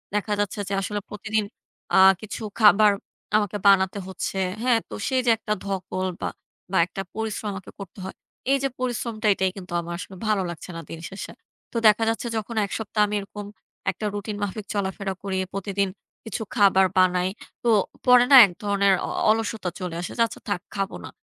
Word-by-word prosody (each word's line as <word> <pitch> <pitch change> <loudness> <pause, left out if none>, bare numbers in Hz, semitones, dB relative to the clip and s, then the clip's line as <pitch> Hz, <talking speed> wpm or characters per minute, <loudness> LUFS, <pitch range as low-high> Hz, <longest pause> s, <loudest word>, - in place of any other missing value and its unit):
দেখা 210 0 0
যাচ্ছে 205 0 -1
যে - - -2
আসলে 205 +2 -2
প্রতিদিন 215 +1 -1 0.5
আ - - +7 0.2
কিছু 215 +1 -6 0.2
খাবার 210 -1 +7 0.5
আমাকে 205 -1 -1
বানাতে 195 0 +4
হচ্ছে। 190 +1 -4 0.3
হ্যাঁ? 245 -3 +4
তো - - -9
সেই 260 -1 +2
যে - - +3
একটা 210 -1 -2
ধকল 185 -1 -2
বা - - -1 0.4
বা 190 - +2
একটা 195 +1 -6
পরিশ্রম 220 -1 -3
আমাকে 190 -1 -8
করতে 195 0 -9
হয়। 190 - -7 0.4
এই 275 - +5
যে 275 - +2
পরিশ্রমটা 235 -3 -2
এটাই 190 -1 0
কিন্তু 180 -2 -8
আমার 170 +1 -6
আসলে 195 -1 -8
ভালো 210 -3 +2
লাগছে 175 +2 -8
না - - -5
দিনশেষে। 165 +4 -7 0.4
তো - - -2
দেখা 215 +2 +5
যাচ্ছে 225 +1 -2
যখন 220 +2 -4
এক - - -10
সপ্তাহ 215 -1 -1
আমি 210 - -2
এরকম 205 +1 -8 0.5
একটা 215 - -6
রুটিন 205 +1 -4
মাফিক 205 +1 -4
চলাফেরা 195 -1 -2
করি 190 -1 -2 0.2
প্রতিদিন 195 0 -1 0.4
কিছু 220 0 -4
খাবার 195 -3 +5
বানাই। 185 0 +3 0.3
তো 235 - +2 0.4
পরে 250 -1 +7
না - - +10
এক 180 - -6
ধরনের 200 -1 +3
অ - - -4 0.2
অলসতা 220 -4 -1
চলে 180 -2 -4
আসে। - - -5
যে - - +1
আচ্ছা - - -11
থাক, 200 - 0 0.2
খাবো 195 0 -2
না। - - -8
200 Hz, 185 wpm, -24 LUFS, 190-215 Hz, 0.5 s, না